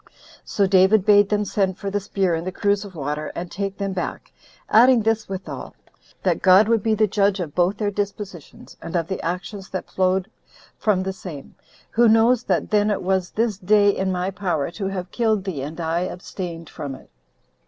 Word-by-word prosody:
So 200 Hz, -, +1 dB
David 190 Hz, +1 st, +4 dB
bade 205 Hz, -1 st, +5 dB
them 210 Hz, 0 st, +1 dB
send 190 Hz, -2 st, 0 dB
for 200 Hz, -1 st, -4 dB
the 205 Hz, -, 0 dB
spear 195 Hz, -2 st, -1 dB
and 165 Hz, +2 st, -3 dB
the -, -, -1 dB
cruse 200 Hz, +2 st, 0 dB
of 195 Hz, -3 st, -11 dB
water, 150 Hz, 0 st, -3 dB
and 175 Hz, 0 st, -5 dB
take 195 Hz, 0 st, -4 dB
them 195 Hz, -1 st, -2 dB
back; 185 Hz, -, -5 dB, 0.4 s
adding 240 Hz, +1 st, +5 dB
this 220 Hz, -1 st, 0 dB
withal, 190 Hz, -1 st, -6 dB, 0.5 s
That -, -, +1 dB
God 190 Hz, +3 st, +6 dB
would 230 Hz, -1 st, +2 dB
be 220 Hz, +1 st, +1 dB
the 215 Hz, 0 st, +3 dB
judge 200 Hz, -1 st, +1 dB
of 160 Hz, -5 st, -4 dB
both 180 Hz, +3 st, +1 dB
their 210 Hz, -1 st, -1 dB
dispositions, 200 Hz, -5 st, -6 dB
and 165 Hz, -, -6 dB
of 170 Hz, -2 st, +1 dB
the 190 Hz, -, -4 dB
actions 185 Hz, +3 st, -5 dB
that 185 Hz, -, -6 dB
flowed 185 Hz, 0 st, +1 dB, 0.5 s
from 195 Hz, -4 st, +1 dB
the 190 Hz, 0 st, -3 dB
same, 160 Hz, -7 st, -9 dB, 0.4 s
"who 235 Hz, +1 st, +4 dB
knows 225 Hz, +2 st, +4 dB
that 185 Hz, -3 st, 0 dB
then 210 Hz, 0 st, +3 dB
it 205 Hz, -, -1 dB
was 185 Hz, -1 st, 0 dB
this 220 Hz, -3 st, -1 dB
day 205 Hz, +1 st, +4 dB
in 190 Hz, 0 st, -1 dB
my 180 Hz, +1 st, -1 dB
power 175 Hz, -6 st, -2 dB
to 195 Hz, +2 st, -4 dB
have 185 Hz, -2 st, -5 dB
killed 220 Hz, -4 st, +1 dB
thee 170 Hz, -9 st, -4 dB
I 160 Hz, +3 st, -2 dB
abstained 175 Hz, -2 st, -6 dB
from 145 Hz, -4 st, -6 dB
it." -, -, -17 dB
190 Hz, 195 wpm, -22 LUFS, 180-205 Hz, 0.5 s, God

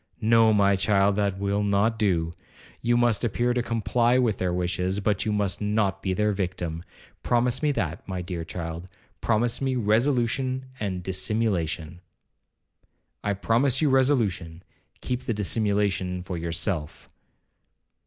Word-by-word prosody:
'No, 115 Hz, 0 st, +5 dB
my 100 Hz, -2 st, +4 dB
child, 100 Hz, 0 st, +2 dB
that 100 Hz, -2 st, 0 dB
will 100 Hz, +1 st, 0 dB
not 105 Hz, +2 st, +1 dB
do, 85 Hz, -6 st, +1 dB, 0.5 s
you 120 Hz, 0 st, +2 dB
must 120 Hz, -2 st, +2 dB
appear 120 Hz, +2 st, +1 dB
to 125 Hz, -, 0 dB
comply 120 Hz, +1 st, +1 dB
with 120 Hz, -6 st, +1 dB
their 90 Hz, -1 st, 0 dB
wishes, 90 Hz, +2 st, -1 dB
but 105 Hz, -1 st, 0 dB
you -, -, +1 dB
must 105 Hz, -2 st, -1 dB
not 105 Hz, -2 st, 0 dB
be 95 Hz, -, -1 dB
their 105 Hz, +3 st, +1 dB
victim,—promise 95 Hz, +6 st, -2 dB
me 150 Hz, -1 st, +2 dB
that, 85 Hz, -, -3 dB
my 95 Hz, -2 st, -3 dB
dear 85 Hz, -2 st, -4 dB
child,—promise 90 Hz, +8 st, -3 dB
me 135 Hz, -1 st, 0 dB
resolution 125 Hz, +3 st, +1 dB
and 95 Hz, -4 st, -3 dB
dissimulation.' 90 Hz, -4 st, -2 dB, 1.2 s
'I 105 Hz, -, 0 dB
promise 115 Hz, +6 st, +2 dB
you 150 Hz, -3 st, +2 dB
resolution, 105 Hz, -, +1 dB, 0.4 s
keep 125 Hz, 0 st, -2 dB
the 115 Hz, -, -1 dB
dissimulation 100 Hz, -3 st, 0 dB
for 90 Hz, -1 st, -5 dB
yourself.' 85 Hz, -1 st, -3 dB
100 Hz, 135 wpm, -26 LUFS, 90-115 Hz, 1.2 s, No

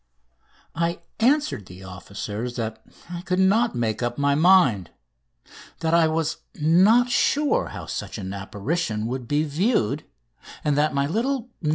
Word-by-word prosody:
I 170 Hz, +1 st, -1 dB, 0.2 s
answered 255 Hz, -, +1 dB
the 90 Hz, +1 st, -12 dB
officers 100 Hz, +5 st, -6 dB
that 110 Hz, -2 st, -4 dB, 0.3 s
I 175 Hz, -1 st, -5 dB
could 180 Hz, 0 st, -2 dB
not 210 Hz, +5 st, +3 dB
make 115 Hz, -2 st, -1 dB
up 120 Hz, 0 st, -2 dB
my 140 Hz, 0 st, +2 dB
mind; 145 Hz, -, +4 dB, 0.9 s
that 160 Hz, 0 st, 0 dB
I 170 Hz, -1 st, +5 dB
was 160 Hz, 0 st, -1 dB, 0.2 s
not 195 Hz, +11 st, +4 dB
sure 300 Hz, -, +2 dB
how -, -, -8 dB
such -, -, -5 dB
an 95 Hz, -2 st, -5 dB
apparition 105 Hz, -, -3 dB
would 125 Hz, +1 st, -4 dB
be 145 Hz, +3 st, +1 dB
viewed; 155 Hz, -, 0 dB, 0.6 s
and 150 Hz, -2 st, +1 dB
that 150 Hz, 0 st, +1 dB
my 140 Hz, 0 st, +2 dB
little 240 Hz, -, -1 dB
"No. 150 Hz, -, -1 dB
150 Hz, 150 wpm, -24 LUFS, 115-190 Hz, 0.9 s, I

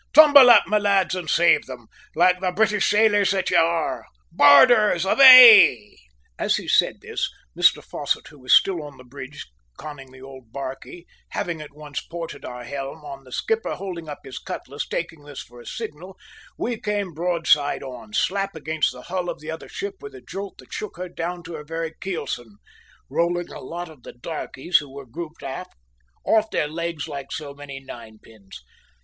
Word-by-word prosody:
Tumble 290 Hz, -4 st, +9 dB
up, 235 Hz, -3 st, +8 dB
my 210 Hz, +1 st, +1 dB
lads, 200 Hz, -2 st, +1 dB
and 180 Hz, -4 st, -4 dB
save 175 Hz, 0 st, +3 dB
them, 125 Hz, -3 st, -10 dB, 0.3 s
like 180 Hz, +2 st, +3 dB
the 185 Hz, -1 st, 0 dB
British 210 Hz, +1 st, +1 dB
sailors 205 Hz, -2 st, +3 dB
that 190 Hz, -1 st, -1 dB
you -, -, +4 dB
are! 165 Hz, 0 st, 0 dB, 0.2 s
Boarders, 185 Hz, -, +5 dB
away!" 230 Hz, -, +8 dB, 0.4 s
As -, -, +1 dB
he -, -, -5 dB
said -, -, +2 dB
this, -, -, -3 dB, 0.3 s
Mr -, -, +3 dB
Fosset, -, -, -3 dB
who 150 Hz, -, -17 dB
was 130 Hz, -1 st, -5 dB
still 180 Hz, +4 st, +4 dB
on 145 Hz, -2 st, -11 dB
the 130 Hz, -, -14 dB
bridge 130 Hz, +2 st, -10 dB, 0.3 s
conning 135 Hz, -3 st, -10 dB
the 130 Hz, -, -15 dB
old 130 Hz, -4 st, -13 dB
barquey, 135 Hz, +6 st, -8 dB, 0.2 s
having 170 Hz, -3 st, -4 dB
at 145 Hz, -1 st, -12 dB
once 150 Hz, -3 st, -7 dB
ported 170 Hz, -1 st, -8 dB
our 125 Hz, -1 st, -8 dB
helm, 140 Hz, +4 st, -7 dB
on 135 Hz, -1 st, -9 dB
the 130 Hz, -, -16 dB
skipper 225 Hz, -, -2 dB
holding 175 Hz, -4 st, -7 dB
up 145 Hz, -, -8 dB
his 135 Hz, -2 st, -8 dB
cutlass, 140 Hz, +3 st, -7 dB
taking 165 Hz, -3 st, -5 dB
this 145 Hz, -2 st, -9 dB
for 120 Hz, 0 st, -16 dB
a -, -, -15 dB
signal, 190 Hz, -5 st, -8 dB, 0.4 s
we 235 Hz, -2 st, -3 dB
came 205 Hz, -4 st, -3 dB
broadside 165 Hz, -4 st, +1 dB
on, 125 Hz, -5 st, -10 dB
slap 195 Hz, -, -1 dB
against 160 Hz, 0 st, -1 dB
the -, -, -12 dB
hull 180 Hz, -1 st, -4 dB
of -, -, -6 dB
the 155 Hz, +1 st, -7 dB
other 160 Hz, -, -9 dB
ship 400 Hz, 0 st, -6 dB
with 425 Hz, -1 st, -10 dB
a 395 Hz, -, -12 dB
jolt 200 Hz, 0 st, -8 dB
that -, -, -15 dB
shook 215 Hz, -, -6 dB
her 180 Hz, 0 st, -6 dB
down 175 Hz, +1 st, -5 dB
to 170 Hz, +1 st, -9 dB
her 150 Hz, -2 st, -7 dB
very 165 Hz, +1 st, -5 dB
kelson, 120 Hz, -, -5 dB, 0.5 s
rolling 175 Hz, +1 st, -1 dB
a -, -, -9 dB
lot 175 Hz, +6 st, -7 dB
of 155 Hz, -5 st, -16 dB
the -, -, -12 dB
darkies, 150 Hz, +4 st, -2 dB
who 145 Hz, -2 st, -11 dB
were 140 Hz, 0 st, -10 dB
grouped 160 Hz, +5 st, -9 dB
aft, 135 Hz, +7 st, -7 dB, 0.5 s
off 220 Hz, 0 st, +2 dB
their 150 Hz, -, -1 dB
legs 165 Hz, 0 st, -5 dB
like 140 Hz, -3 st, -8 dB
so 145 Hz, -3 st, -6 dB
many 140 Hz, -1 st, -9 dB
ninepins. 110 Hz, -, -13 dB
165 Hz, 185 wpm, -22 LUFS, 140-190 Hz, 0.5 s, Tumble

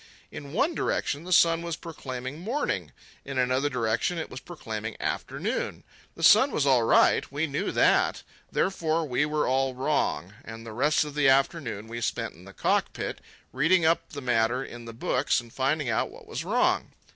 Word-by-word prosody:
In 140 Hz, -1 st, -8 dB
one 275 Hz, -, +1 dB
direction 145 Hz, -, -1 dB
the 185 Hz, -, -7 dB
sun 165 Hz, -1 st, +5 dB
was 170 Hz, -1 st, -3 dB
proclaiming 135 Hz, -4 st, -7 dB
morning, 235 Hz, +12 st, -2 dB, 0.3 s
in 140 Hz, -1 st, -6 dB
another 130 Hz, +3 st, +2 dB
direction 120 Hz, +6 st, 0 dB
it 160 Hz, -, -5 dB
was -, -, -6 dB
proclaiming -, -, -6 dB
afternoon. -, -, -3 dB, 0.3 s
The -, -, -7 dB
sun 270 Hz, -, +7 dB
was 150 Hz, -, 0 dB
all 130 Hz, -3 st, +5 dB
right—we 140 Hz, +5 st, +3 dB
knew 140 Hz, -2 st, -2 dB
that; -, -, +3 dB, 0.3 s
therefore 165 Hz, -4 st, 0 dB
we 140 Hz, +3 st, +1 dB
were 150 Hz, 0 st, 0 dB
all 130 Hz, 0 st, +1 dB
wrong. 130 Hz, -, -1 dB
And 115 Hz, 0 st, -9 dB
the 110 Hz, -, -8 dB
rest 150 Hz, +6 st, +2 dB
of 150 Hz, -, -7 dB
the 145 Hz, -2 st, +3 dB
afternoon 135 Hz, -6 st, +1 dB
we 120 Hz, +1 st, -6 dB
spent 115 Hz, -1 st, -2 dB
in 90 Hz, +3 st, -16 dB
the 95 Hz, -, -11 dB
cockpit -, -, -1 dB, 0.3 s
reading 160 Hz, +6 st, +3 dB
up 165 Hz, +1 st, +2 dB
the 145 Hz, -, -7 dB
matter 120 Hz, +1 st, +1 dB
in 120 Hz, 0 st, -10 dB
the 115 Hz, -, -8 dB
books 115 Hz, -, +1 dB
and 120 Hz, -1 st, -12 dB
finding 140 Hz, +2 st, 0 dB
out 115 Hz, -2 st, 0 dB
what -, -, -14 dB
was -, -, -5 dB
wrong. -, -, +1 dB
140 Hz, 180 wpm, -27 LUFS, 120-160 Hz, 0.3 s, sun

